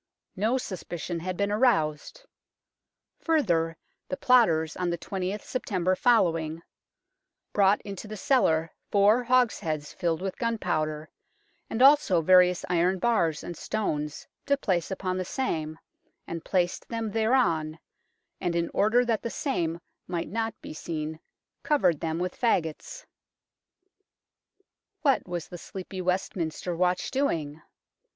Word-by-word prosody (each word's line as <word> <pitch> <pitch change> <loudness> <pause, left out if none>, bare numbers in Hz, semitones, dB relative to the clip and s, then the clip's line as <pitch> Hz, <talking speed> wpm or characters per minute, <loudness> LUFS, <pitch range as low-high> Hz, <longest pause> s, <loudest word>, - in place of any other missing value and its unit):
No 220 +7 +1
suspicion 175 -6 -5
had 180 +2 -4
been 200 0 0
aroused. 210 - +1 0.9
Further, 170 - +1 0.3
the 275 - -3
plotters 190 - +3
on 180 -1 -1
the 170 - -1
20th 190 +3 -4
September 185 -7 -1
following 165 -9 +2 0.4
" - - -57
brought 200 0 +4
into 200 0 -7
the 215 0 -7
cellar 170 - +2 0.2
four 210 +4 +4
hogsheads 210 -12 +1
filled 165 -2 -1
with 190 0 -4
gun 230 -1 0
powder, 155 -5 -2 0.6
and 240 - +1
also 275 - +6
various 180 +1 +5
iron 180 +2 +2
bars 175 -7 +1
and 175 - -6
stones 150 -10 -3 0.2
to 280 0 +3
place 180 - 0
upon 185 -1 -2
the 185 - -1
same, 160 - -3 0.5
and 165 -1 -6
placed 180 -1 0
them 230 -2 -3
thereon, 200 -9 +1 0.6
and 175 -2 -1
in 170 0 0
order 230 +5 +3
that 230 -3 0
the 235 - -3
same 170 - -2 0.3
might 175 -2 -3
not 225 +1 -3
be - - -7
seen 155 0 -5 0.4
covered 275 - +2
them 160 0 -2
with 180 +1 -3
faggots." 230 - -1 2.0
What 275 - +2
was 175 -2 -4
the 175 - -9
sleepy 185 +1 -7
Westminster 180 -2 -2
watch 180 +1 0
doing 160 - -1
185 Hz, 130 wpm, -27 LUFS, 165-225 Hz, 2.0 s, also